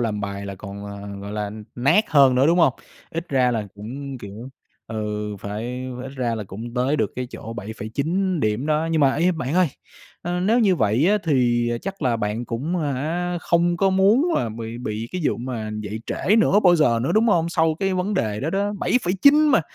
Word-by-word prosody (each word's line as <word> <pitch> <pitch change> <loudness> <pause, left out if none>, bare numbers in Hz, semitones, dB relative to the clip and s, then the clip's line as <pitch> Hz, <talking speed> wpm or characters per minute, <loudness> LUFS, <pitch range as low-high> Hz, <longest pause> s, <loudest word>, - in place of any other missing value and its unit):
làm 110 -3 -1
bài 100 0 -5
là 100 - -5
còn, 100 +1 -8
à, 100 0 -7
gọi 100 +1 -7
là, 105 -1 -3
n 105 0 -9
nát 140 - +3
hơn 140 -4 +6
nữa, 130 +3 +4
đúng 170 +2 +3
hông? 160 -6 +5 0.4
Ít 165 +1 -5
ra 130 -3 +2
là 110 -3 -2
cũng, 130 +6 -7
kiểu 105 +4 -9 0.4
ừ, 105 -1 -4
phải 120 +6 -5
ph 125 - -7
ít 135 - -7
ra 120 -3 -1
là 110 -2 -5
cũng 115 +6 -8
tới 130 +4 +1
được - - -1
cái 125 0 -3
chỗ 115 - -8
7,9 140 - -2
điểm 110 +5 0
đó. 155 +1 +1
Nhưng 160 -1 +2
mà, 135 -2 +4
ê, 175 +4 +2
bạn 150 -3 -3
ơi, 180 -2 +4 0.5
ơ, 175 +1 -2
nếu 215 +6 +3
như 200 -6 +3
vậy 115 +4 +2
á 210 +1 +3
thì 120 -5 +2
chắc 195 -2 -6
là 125 -4 +2
bạn 110 +2 -2
cũng 130 +10 -3
à 145 -2 -1
hả, 175 +6 -2
không 175 +1 +2
có 195 +1 +2
muốn 200 - +4
là 120 - 0
bị 115 +1 -6
bị 110 -1 -4
cái 180 - -2
vụ - - +1
mà 120 -3 -4
dậy 105 +1 -5
trễ 210 - +1
nữa 215 -2 +4
bao 180 -4 +5
giờ 125 -8 +3
nữa, 160 - 0
đúng 225 +2 +4
hông? 170 -5 +2
Sau 160 -1 +2
cái 195 -1 0
vấn 185 +3 -1
đề 110 - -1
đó 150 - -2
đó, 200 +3 0
7,9 255 - +4
mà, 280 - +5
130 Hz, 225 wpm, -23 LUFS, 110-175 Hz, 0.5 s, hơn